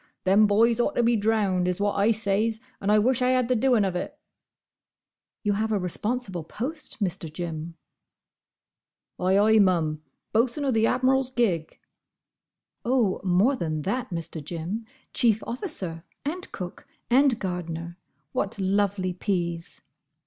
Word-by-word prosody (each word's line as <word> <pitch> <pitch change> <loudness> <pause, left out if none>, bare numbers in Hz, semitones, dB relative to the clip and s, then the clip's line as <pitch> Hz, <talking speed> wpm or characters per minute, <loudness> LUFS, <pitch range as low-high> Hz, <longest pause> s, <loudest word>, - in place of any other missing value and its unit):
"Them 200 +3 +5
boys 225 +3 +3
ought 295 +5 +1
to 240 - +2
be 235 0 +3
drownded, 205 -4 +1
is 180 - -2
what 205 0 +1
I 200 +2 +2
says; 220 +1 0 0.2
and 200 - +1
I 210 - +6
wish 245 +4 +2
I 250 - +3
had 255 -1 +2
the 255 - +3
doing 240 -3 +3
of 185 -2 -2
it." 180 - -4 1.3
"You 205 -2 +2
have 220 +2 -1
a 210 - +2
responsible 190 0 -2
post, 260 - -5
Mr. 165 -4 -3
Jim." 165 0 -5 1.4
"Ay, 185 +2 +3
ay, 220 +2 +5
mum. 165 -6 +2 0.3
Bosun 240 +6 +2
o' 270 - +2
the 225 -1 +3
Admiral's 260 +1 +2
gig." 205 -11 0 1.1
"Oh, 235 -6 +1
more 195 +9 +3
than 155 -8 -2
that, 230 - -2
Mr. 165 -3 -5
Jim. 175 +8 -5 0.3
Chief 225 -4 +3
officer, 200 - -4 0.2
and 355 +6 -4
cook, 180 -1 -7 0.2
and 265 -1 +5
gardener—what 170 - -5
lovely 195 -1 0
peas!" 175 -3 -3
205 Hz, 140 wpm, -26 LUFS, 180-235 Hz, 1.4 s, I